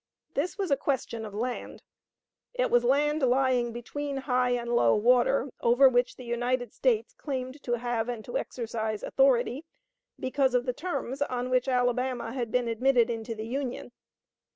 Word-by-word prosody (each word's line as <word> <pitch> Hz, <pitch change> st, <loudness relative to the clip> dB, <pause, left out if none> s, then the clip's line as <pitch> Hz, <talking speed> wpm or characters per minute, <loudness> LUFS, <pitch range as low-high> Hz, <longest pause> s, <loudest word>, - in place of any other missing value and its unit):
This 355 Hz, +7 st, -2 dB
was 385 Hz, -6 st, -2 dB
a -, -, +6 dB
question 235 Hz, -5 st, -2 dB
of 205 Hz, -, -10 dB
land. 245 Hz, +3 st, -4 dB, 0.7 s
It -, -, 0 dB
was 240 Hz, 0 st, +4 dB
land 295 Hz, +4 st, +2 dB
lying 255 Hz, -2 st, +2 dB
between 275 Hz, +4 st, -5 dB
high 255 Hz, -2 st, +1 dB
and 240 Hz, -1 st, -1 dB
low 115 Hz, -, +4 dB
water, 245 Hz, +4 st, +3 dB
over 245 Hz, +4 st, +6 dB
which 245 Hz, -1 st, +2 dB
the 255 Hz, -, -10 dB
United 245 Hz, 0 st, -1 dB
States -, -, +1 dB
claimed 275 Hz, -, -5 dB
to 240 Hz, -, -2 dB
have 240 Hz, -1 st, -1 dB
and 230 Hz, -3 st, -5 dB
to 245 Hz, -, -7 dB
exercise 220 Hz, -3 st, -3 dB
authority, 270 Hz, +1 st, +2 dB, 0.6 s
because 260 Hz, 0 st, +1 dB
of 245 Hz, 0 st, +2 dB
the 250 Hz, -, -1 dB
terms 290 Hz, -3 st, -4 dB
on 250 Hz, -2 st, -2 dB
which 255 Hz, +1 st, +2 dB
Alabama 250 Hz, -1 st, 0 dB
had 240 Hz, -4 st, -3 dB
been 250 Hz, -1 st, +1 dB
admitted 240 Hz, +1 st, +2 dB
into 225 Hz, 0 st, -4 dB
the 215 Hz, 0 st, -5 dB
Union. 250 Hz, 0 st, -4 dB
250 Hz, 165 wpm, -28 LUFS, 240-270 Hz, 0.7 s, a